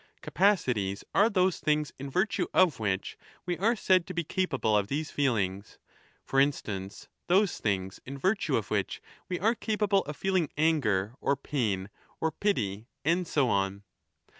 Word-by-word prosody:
Capacities 125 - +1
are 205 +3 +5
those 185 -3 +2
things 150 -1 0
in 140 +1 -5
virtue 185 +9 0
of 175 -10 +4
which 100 -3 -2 0.3
we 175 0 -1
are 225 +5 +3
said 185 -4 +3
15 - - -18
to 185 - -5
be 170 - 0
capable 135 - 0
of 100 -1 +2
these 150 +6 -3
feelings; 105 -8 -1 0.5
for 135 - +1
instance, 105 -9 -1 0.2
those 190 +2 +3
things 95 -3 -2
in 140 +2 -7
virtue 195 +8 +1
of - - -4
which - - -1 0.3
we 180 - -2
are 220 +5 +3
capable 210 -4 +1
of 150 -1 -6
feeling 185 -2 +1
anger 120 -11 +2
or 140 - +2
pain 110 -10 -1 0.3
or 160 - 0
pity, 115 - -1 0.2
and 170 +2 +2
so 140 -4 +2
on. 100 -2 0
145 Hz, 165 wpm, -29 LUFS, -, 0.5 s, are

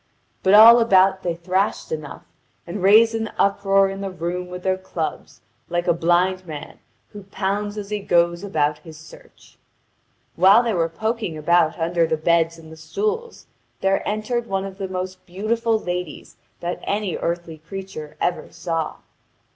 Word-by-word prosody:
But 190 +2 +4
all 230 +3 +10
about 190 -4 +4
they 175 -2 -2
thrashed 185 +4 -1
enough, 155 -2 -6 0.4
and 180 +3 -6
raised 220 +4 +6
an 225 -1 -2
uproar 195 0 +3
in 195 0 -6
the 195 - -3
room 180 0 -4
with 180 0 -8
their 190 0 +1
clubs, 185 -4 -6 0.3
like 175 0 -1
a 175 - +4
blind 175 +2 +1
man 150 -2 -8 0.3
who 205 -2 -11
pounds 205 +2 -3
as 205 0 -6
he 210 - -1
goes 170 -2 +1
about 150 -6 0
his 160 -3 -13
search. 160 0 -17 0.8
While 195 +7 +6
they 230 -2 0
were 165 -3 0
poking 215 0 -3
about 160 +1 +2
under 165 0 +1
the 160 - 0
beds 165 +1 +1
and 160 -1 -14
the 160 - -11
stools, 430 - -4 0.4
there 195 0 +2
entered 230 +3 -2
one 195 0 -2
of 195 0 -9
the 195 - -3
most 185 0 -5
beautiful 220 +5 0
ladies 180 -5 -5 0.3
that 175 +1 -3
any 205 -3 -2
earthly 170 -2 -4
creature 165 -3 -8
ever 175 - -2
saw. 165 -2 -3
185 Hz, 165 wpm, -22 LUFS, 170-200 Hz, 0.8 s, all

